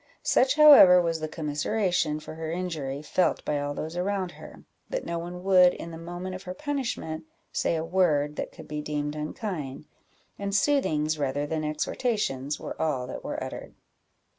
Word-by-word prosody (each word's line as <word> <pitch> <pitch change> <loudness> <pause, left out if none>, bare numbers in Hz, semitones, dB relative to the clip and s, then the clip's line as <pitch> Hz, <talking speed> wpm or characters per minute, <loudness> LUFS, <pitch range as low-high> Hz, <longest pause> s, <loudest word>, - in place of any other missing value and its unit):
Such, 260 +2 +3
however, 285 -13 +9
was 165 -2 0
the 155 - -3
commiseration 155 +1 -1
for 155 - -9
her 160 0 -5
injury 155 -6 -3
felt 180 +4 +1
by 150 -1 0
all 145 0 -3
those 160 +2 -5
around 185 0 -1
her, - - -13 0.3
that - - -3
no 170 - -2
one 175 +1 -7
would, 185 -2 +6
in 170 - -7
the 165 - -7
moment 175 +2 -6
of 185 - -6
her 180 -1 -7
punishment, 250 - -3 0.3
say - - 0
a 160 0 -2
word 155 -5 +2
that - - -4
could - - -12
be 150 0 -4
deemed 150 0 -3
unkind; 150 - -5 0.5
and 200 0 -2
soothings, 155 - +2
rather 145 +1 -1
than 155 +1 -2
exhortations, 150 - -1
were - - -6
all 140 -6 0
that 130 - -7
were - - -4
uttered. - - -8
165 Hz, 175 wpm, -27 LUFS, 150-185 Hz, 0.5 s, however